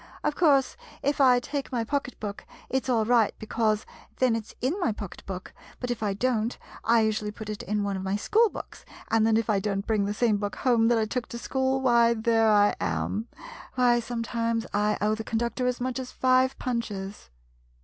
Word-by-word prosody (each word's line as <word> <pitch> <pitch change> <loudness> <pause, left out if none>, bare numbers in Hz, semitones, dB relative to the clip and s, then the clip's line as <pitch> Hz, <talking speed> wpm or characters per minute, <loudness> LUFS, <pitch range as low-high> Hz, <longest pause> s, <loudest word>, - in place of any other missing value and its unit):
Of 300 - 0
course, 280 -6 +3 0.3
if 285 0 +1
I 250 -2 +6
take 280 +3 -4
my 240 -3 0
pocket 275 +1 -3
book, 205 -1 -6 0.2
it 265 0 0
's - - -3
all 225 -3 +2
right, 230 -2 +3
because, 215 -1 0 0.3
then 255 -3 +3
it 220 -1 -4
's - - -15
in 290 +11 -1
my 250 - +1
pocket 205 -3 -8
book, 185 -1 -6 0.3
but 250 -1 -3
if 240 - -3
I 205 -2 0
don't, 235 0 0 0.3
I 230 0 +4
usually 215 -1 0
put 215 0 -8
it 210 - -5
in 210 0 -1
one 200 -1 -1
of 190 - -4
my 190 +1 -1
school 430 - +3
books, - - -9 0.3
and 225 -1 +4
then 220 -1 +4
if 225 - 0
I 210 -3 +2
don't 200 0 -2
bring 215 -3 +1
the 205 - -1
same 220 -2 +2
book 205 0 -3
home 235 -3 +3
that 235 0 +3
I 220 - +2
took 240 +3 -3
to 235 - -7
school, 265 +2 0
why, 235 -2 +4
there 225 0 +3
I 205 -1 +4
am! 220 +3 -2 0.5
Why, 245 -1 +4
sometimes 230 -1 -2
I 210 +1 +1
owe 210 +1 +2
the 220 +1 -4
con 225 - -2
ductor 235 +2 -1
as 250 0 -1
much 255 +1 -2
as 255 -1 -6
five 260 +1 +2
punches! 210 -5 -4
230 Hz, 220 wpm, -27 LUFS, 210-250 Hz, 0.5 s, I